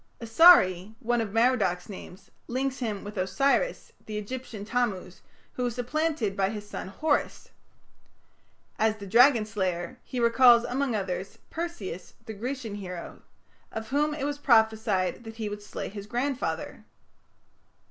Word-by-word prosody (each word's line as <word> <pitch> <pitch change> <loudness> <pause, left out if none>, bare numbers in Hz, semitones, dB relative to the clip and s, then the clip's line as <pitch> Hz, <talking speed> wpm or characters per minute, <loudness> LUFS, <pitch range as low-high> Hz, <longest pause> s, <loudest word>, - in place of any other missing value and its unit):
Asari, 220 - +6
one 240 +1 0
of 215 -3 -4
Merodach's 215 -6 +2
names, 190 -2 -11 0.2
links 260 +2 -2
him 215 -6 -3
with 205 +1 -8
Osiris, 275 - 0 0.2
the 215 -1 -4
Egyptian 215 -1 -6
Tammuz, 210 -6 -2 0.3
who 250 - -3
was 240 -2 -2
supplanted 250 -4 -1
by 195 -1 +1
his 210 -1 -6
son 205 - -6
Horus. 305 +12 -1 1.3
As 220 0 +2
the 200 - -9
dragon 235 +3 +5
slayer, 185 -5 -3
he 255 - -5
recalls, 235 0 +6
among 255 -1 -1
others, 190 -1 -4
Perseus, 320 - -6
the 220 - -6
Grecian 240 +1 -5
hero, 180 -4 -7 0.5
of 220 0 -6
whom 295 +2 +1
it 295 - -5
was 290 0 -2
prophesied 220 -6 +2
that 225 -1 -9
he 220 -2 -4
would 205 0 -6
slay 205 - -6
his 200 0 -8
grandfather. 255 +4 -3
220 Hz, 140 wpm, -27 LUFS, 200-255 Hz, 1.3 s, Asari